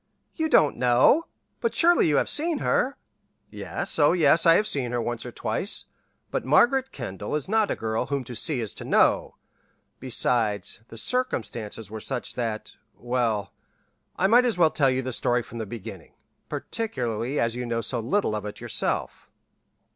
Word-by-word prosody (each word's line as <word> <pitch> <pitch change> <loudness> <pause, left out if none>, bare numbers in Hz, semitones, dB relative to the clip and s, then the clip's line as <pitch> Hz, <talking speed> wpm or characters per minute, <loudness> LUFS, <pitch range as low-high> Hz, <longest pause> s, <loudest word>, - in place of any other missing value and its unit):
"You 320 -1 -1
don't 150 - +4
know! 125 - +4 0.3
But, 465 - -1
surely 345 - +5
you 150 - +2
have - - +2
seen 320 +1 +1
her!" 275 0 0 0.5
"Yes, - - -3
oh, 145 +2 +5
yes, 165 -1 +4
I 165 - +8
have 210 - +3
seen 135 - -2
her, 120 - 0
once 120 0 -3
or - - -7
twice, 195 - -3 0.5
but - - -1
Margaret 265 +1 +3
Kendall 105 -2 -5
is 150 - -3
not 220 +1 +2
a - - 0
girl 110 0 -2
whom 140 -2 -2
to 125 - -9
see 130 +3 -1
is 110 - -5
to - - -9
know; - - +2 0.6
besides, 115 -5 0
the 115 - -11
circumstances 115 - -3
were 110 - -5
such 125 +3 -3
that 115 -3 -4 0.3
well, 120 -4 -1 0.6
I 185 - +1
might 235 +5 +6
as 235 -7 0
well 165 -3 +4
tell 140 -3 +2
the 130 0 -2
story 120 +1 +1
from 115 +1 -9
the 110 - -4
beginning, 100 -5 -9 0.4
particularly 130 - -3
as 115 0 0
you 125 0 -4
know 115 -1 -1
so 115 +2 -2
little 125 - 0
of 105 - -4
it 105 - -8
yourself." - - -2
125 Hz, 175 wpm, -25 LUFS, 115-185 Hz, 0.6 s, I